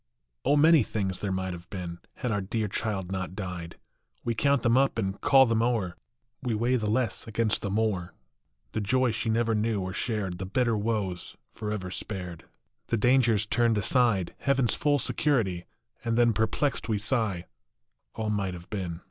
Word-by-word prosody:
O 140 +3 +3
many 160 0 +7
things 95 -4 -2
there 100 - -2
might 95 -1 -2
have 85 +1 -10
been, 85 -3 -6 0.2
Had 125 - -2
our 105 -2 0
dear 110 +3 -1
child 95 -2 -3
not 95 -1 -3
died. 90 -4 -6 0.5
We 120 - 0
count 140 +3 +2
them 120 0 +4
up 135 -2 +3
and 95 -2 -2
call 135 -2 +6
them 115 -2 +1
o 120 0 +2
er, 90 -3 -5 0.5
We 120 -3 -1
weigh 120 +4 +2
the 110 -3 -1
less 115 0 -1
against 110 0 0
the 100 - -2
more, 100 -4 -1 0.6
The 110 - -2
joy 130 +4 +2
she 110 +1 -2
never 115 0 +2
knew 110 0 +1
or 95 0 -3
shared, 100 -6 -2
The 95 - -3
bitter 120 +2 +1
woes 105 -4 -2
forever 105 -4 -4
spared, 90 -4 -5 0.4
The 115 - +1
dangers 120 -2 +4
turned 115 +1 +2
aside, 105 -3 +2
Heaven 140 -2 +2
s - - +1
full 145 -1 +2
security, 115 -10 +1 0.4
and 115 -1 0
then 120 -1 +5
Perplexed 115 +3 0
we 110 - +2
sigh, 105 -5 -1 0.7
all 110 -1 -2
might 100 -3 -1
have 85 0 -12
been. 90 -5 -3
110 Hz, 180 wpm, -28 LUFS, 95-120 Hz, 0.7 s, many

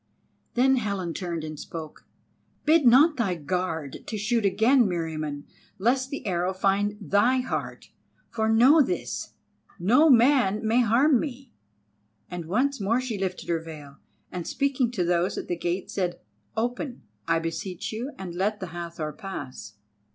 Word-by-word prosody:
Then 265 +2 +4
Helen 200 -7 -2
turned 170 -3 -4
and 155 -1 -6
spoke: 160 -2 -8 0.6
"Bid 310 -3 +5
not 285 +6 +6
thy 200 -7 0
guard 160 -3 -3
to 220 - -3
shoot 220 +1 0
again, 235 +5 +4
Meriamun, 155 -5 -3 0.3
lest 255 +6 +1
the 280 -3 -6
arrow 180 -1 0
find 200 +2 +1
thy 215 +5 +2
heart, 250 - -5 0.4
for, 220 -1 0
know 255 +8 +6
this, 365 +6 -3 0.4
no 250 - +4
man 240 -5 +4
may 235 +3 +4
harm 245 +4 +4
me;" 265 -2 -6 0.8
and 175 -2 -5
once 255 - 0
more 225 +5 +2
she 245 -5 -4
lifted 185 -1 -3
her 170 -1 +1
veil, 150 -4 -10 0.3
and 175 -2 -5
speaking 275 -3 0
to 220 -7 -1
those 175 +1 +1
at - - -5
the 175 - -1
gates 175 +2 -3
said: 180 -3 -2 0.4
"Open, 245 +3 -3 0.2
I - - +3
beseech 165 +4 -4
you, 240 +6 -4
and 185 -3 -6
let 205 +4 -1
the 185 -3 -6
Hathor 170 -3 -5
pass." 145 - -7
200 Hz, 150 wpm, -26 LUFS, 175-245 Hz, 0.8 s, not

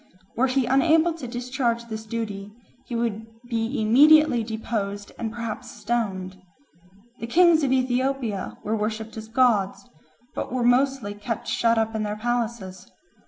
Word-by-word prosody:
Were 260 +3 +2
he 260 0 +1
unable 315 +6 +3
to 315 -6 -7
discharge 240 -1 -2
this 220 -1 -7
duty, 210 -3 -4 0.4
he 240 - -4
would 230 -2 -1 0.3
be 230 +3 -1
immediately 270 +3 +6
deposed 215 -2 -4
and 225 -2 -3
perhaps 230 -2 -5
stoned. 190 -5 -3 0.8
The 230 - -5
kings 335 +3 +5
of 270 - +1
Ethiopia 255 -4 -1
were 215 +2 -1
worshipped 220 +1 -3
as 220 0 -7
gods, 215 -5 +1 0.5
but - - -4
were 255 -1 -1
mostly 250 -3 +2
kept 210 +2 -5
shut 230 0 +2
up 225 0 0
in 220 - -2
their 210 0 -3
palaces. 230 -5 -3
230 Hz, 145 wpm, -24 LUFS, 215-255 Hz, 0.8 s, immediately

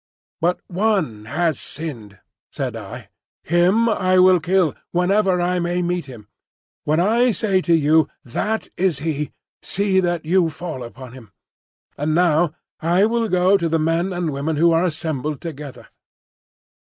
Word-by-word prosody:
"But 175 +2 +1
one 185 - -1
has 160 +4 -1
sinned," 120 -10 -6 0.3
said - - -4
I. - - -9 0.3
"Him 180 +8 +3
I 185 -4 +2
will 185 0 +6
kill, 175 -2 +1 0.2
whenever 185 +1 +2
I 180 +1 0
may 175 +1 -1
meet 175 -3 -2
him. 115 -6 -12 0.6
When 155 +2 +2
I 230 +7 +3
say 195 -3 +1
to 170 -2 +3
you, 155 +1 +3 0.2
'That 215 - -3
is 180 -5 +1
he,' 150 0 -3 0.3
see 195 -1 +1
that 175 -3 -1
you 175 0 +3
fall 160 -4 -6
upon 125 +1 -10
him. 115 -7 -14 0.7
And 155 +2 0
now 170 -2 +3 0.3
I 175 +4 +3
will 230 0 0
go 185 +2 +4
to 170 -3 -1
the 165 - +2
men 165 +4 0
and 175 -3 -2
women 145 +3 -2
who 170 +3 +4
are 165 +2 +3
assembled 155 -4 -3
together." 150 -4 -8
170 Hz, 155 wpm, -21 LUFS, 155-185 Hz, 0.7 s, will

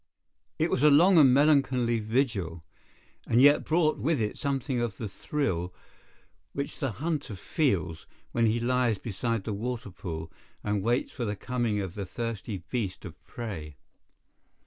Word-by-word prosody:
It - - +1
was - - +1
a 150 - +7
long 170 +5 +6
and 135 -4 +7
melancholy 130 -4 +3
vigil, 105 - -1 0.6
and 115 - +3
yet 145 +2 +6
brought 155 -4 +2
with 150 +7 +1
it 105 -2 -1
something 135 -3 -1
of 115 -4 -2
the 110 - -4
thrill 95 - -2 0.8
which 140 0 -4
the 135 -5 -1
hunter 145 - -3
feels 90 - -1 0.2
when 115 -1 +2
he 110 +2 +1
lies 120 -2 +1
beside 115 +1 -2
the 110 - -3
water 115 0 -4
pool, 80 -3 -6 0.3
and 105 -1 0
waits 120 +5 0
for 125 - -5
the 105 -2 -2
coming 120 -1 -1
of 95 -3 -5
the 100 -2 -5
thirsty 110 -4 -4
beast 110 -7 -3
of - - -11
prey. 85 -11 -6
115 Hz, 155 wpm, -28 LUFS, 100-135 Hz, 0.8 s, a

